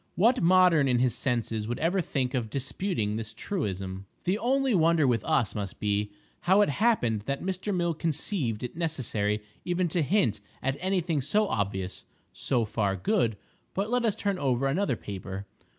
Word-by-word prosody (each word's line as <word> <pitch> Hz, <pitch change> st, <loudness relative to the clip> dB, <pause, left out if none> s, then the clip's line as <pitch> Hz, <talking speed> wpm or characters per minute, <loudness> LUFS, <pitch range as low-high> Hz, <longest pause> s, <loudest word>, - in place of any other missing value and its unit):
What 235 Hz, +7 st, +4 dB
modern 175 Hz, -4 st, +5 dB
in 125 Hz, -2 st, +3 dB
his 125 Hz, 0 st, +2 dB
senses 115 Hz, -3 st, -1 dB
would 120 Hz, -, -2 dB
ever 180 Hz, +4 st, +1 dB
think 130 Hz, -5 st, -1 dB
of 120 Hz, -4 st, -1 dB
disputing 135 Hz, -, -2 dB
this 110 Hz, -1 st, -6 dB
truism? 95 Hz, -, -3 dB, 0.2 s
The 190 Hz, +4 st, 0 dB
only 265 Hz, +1 st, +2 dB
wonder 165 Hz, -4 st, +4 dB
with 120 Hz, -4 st, +2 dB
us 110 Hz, -, +2 dB
must 100 Hz, -3 st, -5 dB
be, 105 Hz, 0 st, 0 dB, 0.3 s
how 190 Hz, +4 st, +4 dB
it 205 Hz, -, +3 dB
happened 140 Hz, -, +2 dB
that 140 Hz, 0 st, -2 dB
Mr. 190 Hz, +2 st, -2 dB
Mill 175 Hz, -3 st, +1 dB
conceived 150 Hz, -, -1 dB
it 125 Hz, -, -5 dB
necessary 115 Hz, -11 st, -1 dB, 0.2 s
even 180 Hz, 0 st, 0 dB
to 170 Hz, +2 st, +1 dB
hint 150 Hz, -, +1 dB, 0.2 s
at 135 Hz, +1 st, +1 dB
any 190 Hz, 0 st, +1 dB
thing 165 Hz, -4 st, -1 dB
so 205 Hz, +11 st, +2 dB
obvious. 95 Hz, -, -2 dB, 0.3 s
So 120 Hz, -4 st, 0 dB
far 105 Hz, -2 st, 0 dB
good—but 115 Hz, -, -2 dB
let 245 Hz, -1 st, +2 dB
us 220 Hz, -4 st, +2 dB
turn 200 Hz, -2 st, -1 dB
over 135 Hz, -2 st, +1 dB
another 140 Hz, +1 st, +1 dB
paper. 100 Hz, -1 st, -6 dB
135 Hz, 170 wpm, -28 LUFS, -, 0.3 s, modern